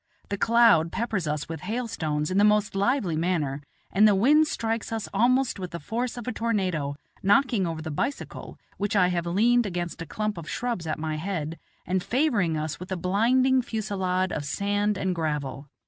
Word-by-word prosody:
The 200 - -2
cloud 225 -9 +5
peppers 220 -8 -2
us 150 0 -2
with 160 -2 -6
hailstones 185 -8 -2
in 190 - +2
the - - +5
most 210 0 +3
lively 200 - +1
manner, 155 -4 -1 0.3
and 210 +3 +5
the 205 - +4
wind 295 +10 +5
strikes 225 -4 -2
us 225 -2 -3
almost 250 +3 +2
with 180 -1 -4
the 170 - -6
force 235 - -3
of 240 - -7
a - - 0
tornado, 185 -11 -1 0.3
knocking 205 -1 +3
over 160 -1 -4
the 160 - -4
bicycle, 275 - -4 0.2
which 205 +1 -1
I 180 -3 +4
have 175 -1 -1
leaned 230 +6 +3
against 175 -2 -4
a 165 - -6
clump 210 0 -3
of 155 - -8
shrubs 235 -9 -3
at 155 - -1
my 155 0 -3
head, 165 -2 -4 0.3
and 185 0 0
favoring 225 - +1
us 155 0 -3
with 180 +2 -9
a 190 - -1
blinding 245 +8 +3
fusilade 190 -5 -1
of 145 - -3
sand 205 +6 0
and 190 -1 0
gravel. 150 -4 -3
195 Hz, 190 wpm, -26 LUFS, 165-225 Hz, 0.3 s, cloud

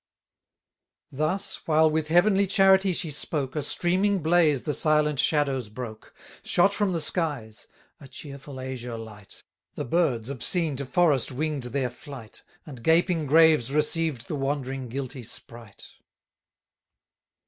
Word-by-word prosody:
Thus, 170 +8 -2
while 160 0 +4
with 155 0 -1
heavenly 195 +4 +3
charity 195 0 +4
she 170 -2 -3
spoke, 140 -2 -2
A 150 - -1
streaming 190 +7 +1
blaze 160 -5 +2
the 150 - -2
silent 150 -2 +2
shadows 135 -7 +1
broke; 110 -1 -9 0.3
650 - - -10
Shot 195 +3 +4
from 205 -2 0
the 170 - -1
skies; 145 - -3 0.3
a 140 - -13
cheerful 140 0 -10
azure 125 -2 -6
light: 105 -3 -12 0.3
The - - -4
birds 125 -6 0
obscene 150 +4 0
to 140 -1 -5
forests 145 -3 +2
wing'd 145 0 -3
their 125 0 -2
flight, 125 -4 -11 0.2
And 135 -6 -10
gaping 165 +1 +2
graves 155 -4 +4
received 150 -3 0
the - - -5
wandering 135 -2 -3
guilty 130 +1 -6
sprite. 115 -2 -9
145 Hz, 135 wpm, -25 LUFS, 130-165 Hz, 0.3 s, while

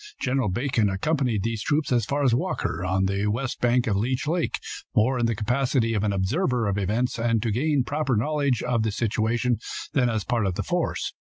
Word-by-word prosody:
General 130 -4 0
Bacon 115 0 +1
accompanied 120 0 0
these 115 -2 -2
troops 145 +5 0
as 120 -3 +2
far 145 +1 0
as 130 -4 +4
Walker, 90 -7 -1
on 95 +1 +1
the 100 +2 0
west 125 +5 -2
bank 120 +1 +3
of 110 -5 +1
Leech 125 +7 -1
lake, 165 +3 0 0.4
more 125 +4 +3
in 120 - +2
the 115 - 0
capacity 120 +1 +1
of 105 -2 0
an 105 - +1
observer 120 - 0
of 100 0 0
events 115 +5 -1
and 115 -1 +2
to 115 - 0
gain 140 +4 +1
proper 145 0 -1
knowledge 140 +1 0
of 125 -2 +1
the 110 0 0
situation 115 +2 0 0.3
than 125 -3 +3
as 110 -3 -1
part 115 -5 0
of 90 - -2
the 105 - -2
force. 175 -1 -2
120 Hz, 210 wpm, -25 LUFS, 105-130 Hz, 0.4 s, as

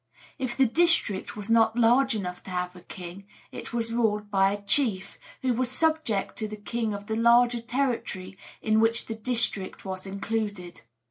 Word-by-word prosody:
If 255 -2 -3
the 270 - +5
district 320 - +2
was 205 -1 -6
not 225 0 +3
large 240 +2 +4
enough 180 -4 -4
to - - -9
have 180 0 -3
a 180 - -12
king, 180 +2 -10 0.2
it - - -8
was 230 -1 -2
ruled 210 -3 0
by 195 -1 +3
a 205 0 -5
chief, 200 -3 0 0.2
who 255 -1 +2
was 250 +1 0
subject 310 -7 0
to 215 - -1
the 215 - -7
king 225 +1 -3
of 200 0 -8
the 220 0 -2
larger 235 +1 +4
territory 235 -7 -2 0.3
in 220 0 +3
which 225 +1 +2
the 225 - -4
district 220 -5 0
was 190 0 -5
included. 200 -2 -4
220 Hz, 180 wpm, -27 LUFS, 195-240 Hz, 0.3 s, the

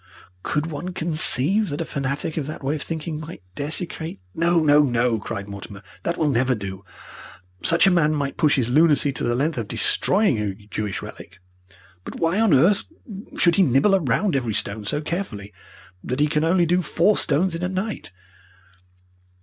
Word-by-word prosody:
Could 150 +8 -1
one 165 +3 -5
conceive 170 +4 +1
that 145 - -4
a 165 - -2
fanatic 140 +2 -3
of 150 -4 -3
that 155 - -7
way 135 +2 0
of 155 - -4
thinking 160 -1 -5
might 155 - -9
desecrate 160 - -3
" - - -36
"No, 170 0 +4
no, 150 -1 +5
no!" 120 -4 +1
cried 100 -2 -6
Mortimer. 100 0 -9 0.2
"That 170 - -2
will 155 - +1
never 130 +1 +1
do! 95 -2 -7 0.8
Such 165 +3 +4
a 195 - +5
man 160 -4 +3
might 140 -2 -2
push 155 -3 +3
his 125 -4 0
lunacy 145 +1 +3
to - - -2
the 120 0 0
length 145 +1 -1
of 110 - -4
destroying 190 - +3
a 100 -2 -2
Jewish 105 0 -5
relic, - - -11 0.7
but - - -8
why 165 +5 +1
on 225 -3 +3
earth 170 +9 +4 0.5
should 170 -1 +3
he - - +5
nibble 185 +6 +4
round 155 - 0
every 120 -6 -1
stone 105 +1 -2
so 145 +8 -1
carefully 125 - -5 0.5
that 125 +2 -3
he 150 - +4
can 150 0 0
only 170 +2 +3
do 180 +2 +2
four 180 +4 +2
stones 180 +4 +1
in 165 - -4
a 180 - -1
night? 190 - -4
150 Hz, 185 wpm, -22 LUFS, 120-170 Hz, 0.8 s, no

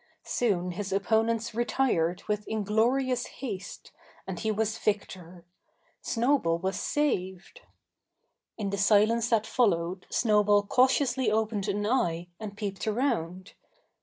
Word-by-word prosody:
Soon 180 -7 0
his 195 +2 -5
opponents 225 +3 +1
retired 225 -8 0
with 210 0 -2
inglorious 235 +4 +1
haste, 215 -8 -7 0.3
and 190 -3 -5
he 220 - -1
was 220 +1 -1
victor 185 -4 -3 0.6
Snowball 235 -8 +1
was 190 +3 -2
saved! 190 - -2 1.0
In 200 -3 -3
the 200 - -2
silence 220 +3 +3
that 220 -2 +2
followed 185 -7 0
Snowball 210 -2 +3
cautiously 255 +1 +2
opened 215 -1 0
an 205 +1 -1
eye 175 -8 0
and 205 -2 -7
peeped 200 -1 -4
around. 210 - -2
210 Hz, 115 wpm, -28 LUFS, 190-235 Hz, 1.0 s, silence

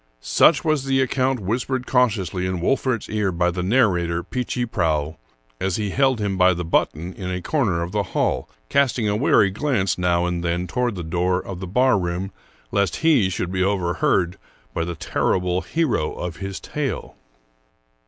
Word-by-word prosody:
Such 130 - +4
was 155 -4 +1
the 135 0 +2
account 130 -1 +1
whispered 125 +6 -2
cautiously 100 -8 +1
in 95 -1 -2
Wolfert's 130 +4 0
ear 105 -3 0
by 90 0 +1
the 90 +1 -3
narrator, 90 -6 +2
Peechy 125 -1 -2
Prauw, 80 -7 -1 0.4
as 95 -2 -1
he 105 -2 -2
held 135 -1 +2
him 100 -2 -1
by 90 0 +5
the 90 0 -4
button 85 +1 0
in 95 0 -6
a 90 0 -2
corner 95 - 0
of 85 - -5
the 105 +1 0 0.2
hall, - - 0 0.2
casting 125 - +2
a 105 - +1
wary 105 -4 +4
glance 105 - 0
now 90 -1 +2
and 90 -1 -2
then 85 +1 -1
toward 120 +2 -1
the 90 - -5
door 90 +2 0
of 95 -1 -7
the 95 - -5
barroom, 95 -4 +1 0.4
lest 100 -1 +1
he 135 -13 +4
should 90 -1 -3
be 95 0 -1
overheard 90 -2 +1 0.3
by 85 - -1
the 85 0 -4
terrible 90 +3 0
hero 120 - 0
of 90 -1 -5
his 95 -1 -5
tale. 140 -8 -4
95 Hz, 175 wpm, -22 LUFS, 90-125 Hz, 0.4 s, by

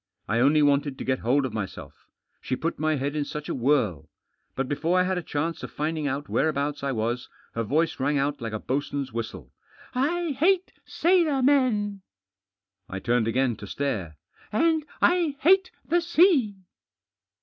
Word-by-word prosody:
I 115 +2 +1
only 145 +4 +4
wanted 140 -1 +2
to - - -5
get 130 0 0
hold 135 +4 +2
of 125 - -4
myself 105 -4 -7 0.3
She 130 - -2
put 165 +5 -3
my 155 0 +1
head 140 +1 -2
in 150 - 0
such 150 +1 -6
a - - -1
whirl. 120 - +1 0.5
But 135 0 -1
before 165 +6 +1
I - - +4
had 185 0 0
a - - -5
chance 165 +1 -3
of - - -6
finding 155 0 -2
out 140 +2 -3
whereabouts 145 -1 0
I 140 - 0
was 120 +1 -2 0.2
her 115 - -2
voice 155 +9 0
rang 145 +2 +1
out 140 0 -1
like 115 -1 -4
a 110 - -2
boatswain's 140 +1 -3
whistle. 95 - -6 0.4
"I 320 +6 0
hate 370 +3 +3 0.2
sailor 330 -6 +2
men." 225 -8 +2 0.9
I 95 - -4
turned 120 +2 +1
again 125 0 +1
to 105 - -9
stare. 95 - -3 0.2
" - - -27
And 315 +5 +2 0.2
I 345 -5 +3
hate 375 +4 +5 0.2
the 345 +1 +2
sea 330 - +4
145 Hz, 175 wpm, -26 LUFS, -, 0.9 s, hate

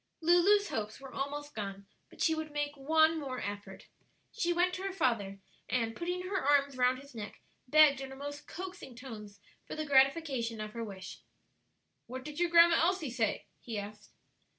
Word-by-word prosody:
Lulu's 355 +5 +4
hopes 215 0 -4
were 270 -1 -11
almost 290 +2 -4
gone, 200 -2 -5 0.2
but - - -5
she 320 - +4
would 315 -1 -3
make 290 0 -2
one 315 +3 +3
more 260 -4 -4
effort. 205 -2 -6 0.5
She 350 -7 0
went 355 +1 +2
to 370 - -4
her 390 0 -2
father, 230 - 0 0.3
and 230 -2 0
putting 355 +1 -3
her 380 +1 -1
arms 280 -1 +3
round 250 0 +3
his 280 +1 -13
neck, 210 -3 -7 0.3
begged 295 -1 +6
in 270 - -6
her 265 - -9
most 285 +1 -7
coaxing 365 -8 -8
tones 215 -5 -10 0.3
for - - -6
the 310 0 -3
gratification 270 -4 +2
of 215 0 -5
her 230 - -4
wish. 190 -3 -8 0.9
"What 255 +1 -6
did 300 +1 -7
your 350 -1 +2
Grandma 335 0 +7
Elsie 335 -5 +1
say?" 230 -4 -1
he 230 -3 -6
asked. 205 +1 -8
275 Hz, 180 wpm, -32 LUFS, 230-325 Hz, 0.9 s, Grandma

